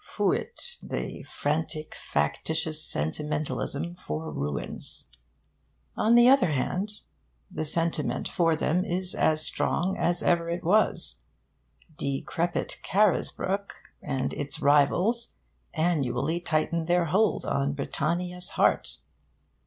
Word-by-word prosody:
Fuit 485 0 -1
the - - -4
frantic 155 +1 -2
factitious 155 - -1
sentimentalism 145 - -2
for 160 -3 -5
ruins. 70 0 -4 0.9
On 225 +2 +4
the 240 0 +8
other 250 - +5
hand, 195 +10 -2 0.5
the 155 - -3
sentiment 165 0 0
for 165 -2 +2
them 170 +3 +1
is 180 +1 -2
as 155 0 +2
strong 185 +3 +1
as 175 0 0
ever 170 -1 +2
it 170 +1 -2
was. 205 +6 +2 0.8
Decrepit 140 +5 -2
Carisbrooke 200 0 +1 0.3
and 130 -1 -2
its 145 -1 -4
rivals 175 - +3 0.4
annually 155 -2 +1
tighten 165 0 0
their 175 0 +3
hold 195 +8 +2
on 140 0 0
Britannia's 175 +5 -2
heart. - - +2
165 Hz, 105 wpm, -27 LUFS, 150-180 Hz, 0.9 s, the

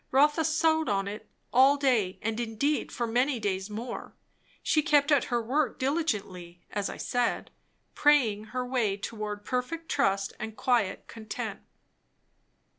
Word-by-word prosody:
Rotha 295 +4 +4
sewed 315 0 +2
on 195 -1 0
it 210 +2 -7 0.2
all 270 +3 +6
day; 240 -10 +1
and 225 +1 -1
indeed 240 +6 -1
for 240 - -2
many 245 +3 +1
days 195 -1 -2
more. 225 +4 -6 0.5
She 310 - +3
kept 295 -2 +3
at 285 -4 +4
her 240 - 0
work 255 +3 0
diligently, 205 - -2
as 205 -1 -2
I - - -7
said, 245 -1 -1 0.4
praying 240 -8 +3
her 250 +3 -3
way 235 -6 0
toward 210 0 -5
perfect 320 +6 -3
trust 195 -5 +1
and 220 0 -6
quiet 235 -7 +1
content. 220 -1 -6
240 Hz, 140 wpm, -28 LUFS, 210-285 Hz, 0.5 s, all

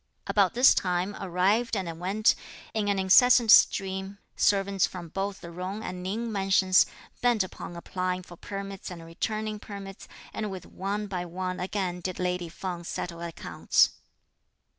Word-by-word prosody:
About 200 -2 +2
this 250 +2 +7
time 180 +2 -1
arrived 200 +5 +1
and 170 -4 -4
went, 200 +5 +3 0.4
in 215 -2 0
an 200 -1 +1
incessant 225 +4 +6
stream, 190 0 +4 0.2
servants 195 -1 +2
from 175 -3 -8
both 195 +3 -3
the 170 0 -9
Jung 185 +5 -5
and 180 -4 -5
Ning 220 +5 -3
mansions, 195 -2 +4 0.3
bent 240 -4 +3
upon 180 -1 -8
applying 185 +1 -3
for 175 - -12
permits 195 +1 -7
and 170 -2 -9
returning 215 +5 -3
permits, 200 -2 -9 0.3
and 215 -1 -3
with 190 -2 -7
one 200 +2 -3
by 185 -3 -3
one 185 +1 -4
again 180 -1 -2
did 185 0 -4
lady 180 -1 -2
Feng 175 0 -5
settle 170 0 -5
accounts. 170 -1 +1
190 Hz, 150 wpm, -27 LUFS, 180-205 Hz, 0.4 s, this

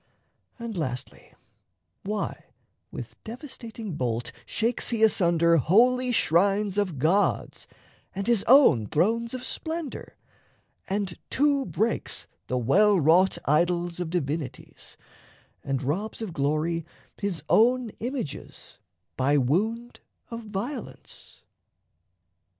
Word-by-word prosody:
And, 235 -3 -6
lastly, 130 -7 -5 0.7
why, 205 0 -4 0.4
with - - -9
devastating 230 - -8
bolt 120 -3 -2 0.2
Shakes 230 +2 0
he 230 -2 0
asunder 170 -5 +4
holy 245 - +4
shrines 200 +1 +2
of 185 -7 -1
gods 170 +9 +1 0.5
And 195 0 -3
his 235 -4 +3
own 225 - +6
thrones 230 - +1
of 255 0 -6
splendour, 320 -2 -5 0.7
and 195 -2 -2
to 280 -1 +2
breaks 225 +2 -1 0.2
The 125 - -1
well 190 - +4
wrought 170 +5 +4
idols 175 +3 +1
of 175 -2 -3
divinities, 155 -3 -5 0.7
And 135 0 -2
robs 190 +11 -2
of 220 -6 -5
glory 155 +3 0 0.4
his 190 -7 -3
own 245 0 +3
images 155 - -6 0.4
By 140 +3 +3
wound 220 - 0 0.3
of 230 0 -5
violence? 215 +7 -7
195 Hz, 105 wpm, -26 LUFS, 160-230 Hz, 0.7 s, own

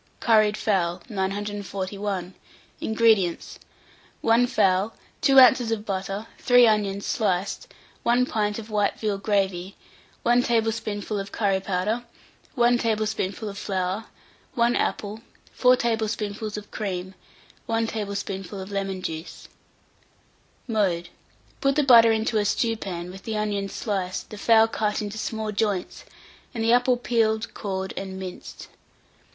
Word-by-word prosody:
CURRIED 215 -2 +4
FOWL. 175 -4 0
941. 195 -1 -3 0.5
INGREDIENTS. 220 -6 +2 0.6
1 230 +2 +4
fowl, 205 -2 +2 0.3
2 270 -1 +6
oz. 250 -2 +6
of 220 -2 -2
butter, 195 +1 -3
3 245 -1 +6
onions 205 -3 +1
sliced, 205 - -1 0.3
1 245 +2 +3
pint 210 -4 -1
of 225 -1 -8
white 205 -1 0
veal 210 -3 -1
gravy, 195 -2 -1 0.5
1 240 +1 +4
tablespoonful 220 -3 -1
of 195 0 -6
curry 195 -3 +1
powder, 195 +5 -1 0.5
1 240 -1 +4
tablespoonful 215 -2 -1
of 200 0 -6
flour, 190 +2 -2 0.5
1 235 0 +3
apple, 210 +2 -2 0.3
4 250 0 +5
tablespoonfuls 220 -2 -2
of 210 0 -9
cream, 190 -3 -4 0.5
1 225 0 +1
tablespoonful 200 -3 -4
of 190 +1 -7
lemon 195 -2 -3
juice. 160 -2 -6 1.2
Mode. 185 -7 0 0.5
Put 275 0 +2
the 300 - +3
butter 230 -4 +7
into 220 0 +1
a 205 - 0
stewpan, 200 -5 -1
with 190 +1 -10
the 220 +1 -4
onions 205 -2 -2
sliced, 190 -4 -3
the 210 - -8
fowl 225 +1 +5
cut 210 -2 -1
into 210 +1 -5
small 220 -1 -3
joints, 205 -3 -2 0.5
and 225 - -1
the 230 +1 +4
apple 245 0 +4
peeled, 225 -3 0
cored, 190 -2 -4
and 190 -1 -5
minced. 185 -1 -8
210 Hz, 130 wpm, -25 LUFS, 195-225 Hz, 1.2 s, butter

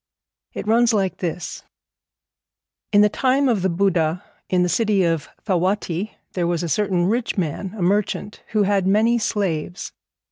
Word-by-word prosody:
It - - -5
runs 230 +1 +3
like 195 -3 0
this: 175 0 -4 1.3
In 205 - +6
the 210 - +6
time 265 +5 +1
of 225 -6 +1
the 190 - +1
Buddha, 170 -2 +1 0.3
in 180 -1 +2
the - - +2
city 200 +2 +2
of 165 -3 0 0.2
Thawatti, 185 0 -1 0.2
there 175 -2 0
was 175 0 -1
a 170 - -2
certain 190 -2 +1
rich 225 +4 -1
man, 185 +3 -3
a 185 - -2
merchant, 205 +2 -1
who 215 -2 +1
had 195 -1 +1
many 225 +4 +3
slaves. 185 -6 -2
195 Hz, 155 wpm, -22 LUFS, 175-210 Hz, 1.3 s, In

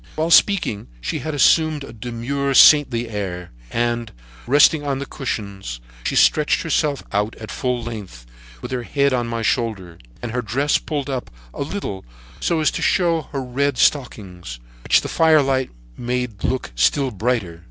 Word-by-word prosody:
"While 160 +2 -1
speaking, 170 - +3
she - - -3
had 155 -1 -4
assumed 155 +1 +3
a 140 - -10
demure 125 +5 -3
saintly 130 -7 +6
air; 95 -5 -5 0.2
and, 120 0 -1 0.4
resting 145 +3 +5
on 140 -2 -1
the 140 - -4
cushions, 100 - -5 0.3
she - - -1
stretched 150 -1 +3
herself 150 -3 0
out 105 +1 -1
at 110 - -9
full 125 -2 -2
length, 100 - -8 0.4
with - - -6
her 125 -1 -2
head 140 +3 +1
on 120 -2 0
my 115 -1 -3
shoulder, 105 -8 -2 0.2
and 120 - -4
her 125 +1 -1
dress 130 +7 0
pulled 145 -4 -4
up 130 -3 -4 0.2
a - - -7
little 140 - -4 0.4
so 165 -2 0
as 155 - +2
to - - -4
show 170 -5 +1
her 135 -2 -3
red 135 +2 -1
stockings, 90 - -1 0.2
which - - +3
the - - -5
firelight 140 -5 +3 0.3
made 125 -4 -3
look 130 - -2
still 130 - +2
brighter. 105 -6 -2
125 Hz, 165 wpm, -21 LUFS, 110-145 Hz, 0.4 s, saintly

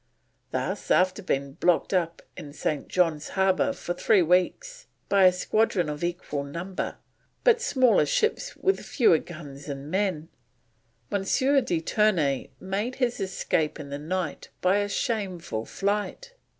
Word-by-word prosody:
Thus - - -3
after 185 +2 +3
being 140 -7 -1
blocked 175 +5 +1
up 170 -3 0
in 150 -5 -9
St. 150 -1 -2
John's 165 -5 +1
Harbour 190 +7 +3
for 175 -9 -4
three 195 0 +3
weeks - - 0 0.2
by 200 -1 +5
a 185 - +8
squadron 180 -2 +1
of 150 +2 -5
equal 170 -5 -3
number, 170 +7 -4 0.5
but 475 -1 +4
smaller 255 - +3
ships 440 - 0
with 385 - +1
fewer 195 - +3
guns 145 -4 -10
and 140 +2 -6
men, 185 -5 -1 0.8
M. 200 - 0
de 260 - +2
Ternay 165 -9 +1
made 205 +7 -3
his 245 -3 0
escape 180 -5 -1
in 145 -2 -7
the 140 - -4
night 170 +1 -3
by 185 +2 +3
a 205 0 0
shameful 185 - -2
flight. 210 - -2
185 Hz, 140 wpm, -26 LUFS, 155-210 Hz, 0.8 s, a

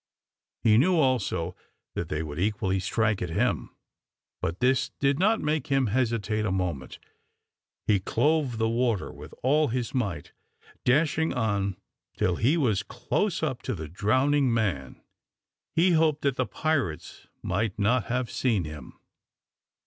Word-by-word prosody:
He 110 0 +5
knew 180 +6 +3
also 120 - +1 0.4
that - - -4
they 75 +1 -2
would 75 0 -6
equally 95 -1 0
strike 105 +2 0
at 90 - -2
him, 80 - 0 0.7
but 85 +3 -2
this 130 0 +2
did 140 +1 +2
not 215 +4 +3
make 150 0 -1
him 135 -2 +2
hesitate 110 -2 0
a 105 - 0
moment. 85 -9 -3 0.9
He 105 -2 +3
clove 145 +4 +1
the 115 0 +1
water 115 -3 0
with - - -11
all 150 +4 +3
his 120 -1 -2
might, 100 - -2 0.5
dashing 155 +4 +2
on 100 -5 0 0.4
till 90 -2 +1
he 140 +9 +3
was 110 - +2
close 125 - -2
up 130 -6 -1
to - - -3
the 80 -3 -6
drowning 130 - +2
man. 95 - -1 0.8
He 180 +3 +4
hoped 155 -2 +2
that 140 -3 +1
the 130 -1 -1
pirates 135 - -2 0.2
might 105 0 -1
not 110 +2 +2
have 125 0 -2
seen 115 -8 +1
him. 75 -4 -9
115 Hz, 145 wpm, -27 LUFS, 95-140 Hz, 0.9 s, He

